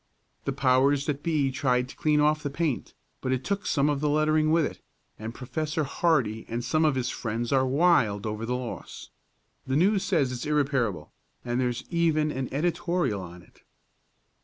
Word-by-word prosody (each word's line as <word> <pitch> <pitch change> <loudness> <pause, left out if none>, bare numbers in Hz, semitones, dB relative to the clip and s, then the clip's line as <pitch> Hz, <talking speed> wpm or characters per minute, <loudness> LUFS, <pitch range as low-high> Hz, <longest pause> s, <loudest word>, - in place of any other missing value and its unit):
The - - 0
powers 135 +2 +3
that 145 -1 -2
be 150 -5 +1
tried 125 -2 +1
to - - -10
clean 150 -1 +2
off 150 +1 +3
the 145 - -3
paint, 145 -2 -2 0.3
but 130 - -2
it 130 0 0
took 200 0 -2
some 140 -1 +2
of 145 -2 +1
the 150 +1 0
lettering 155 +1 +2
with 160 -1 +3
it, - - -6 0.4
and 110 +1 -5
Prof. 135 +6 -4
Hardee 135 -7 +1
and 120 +1 -3
some 155 +6 +2
of 150 -3 +3
his 130 -1 -1
friends 115 0 -3
are 130 -1 +3
wild 130 - +3
over 110 +1 -3
the 125 +2 -1
loss. 125 -1 -7 0.6
The 130 - 0
News 195 +6 +3
says 150 -11 +1
it's 125 +2 -5
irreparable, 135 - 0 0.3
and 120 +1 0
there's 125 0 -1
even 160 -3 +2
an 130 -2 -3
editorial 170 - 0
on 90 -1 -10
it." - - -24
140 Hz, 185 wpm, -27 LUFS, 125-155 Hz, 0.6 s, powers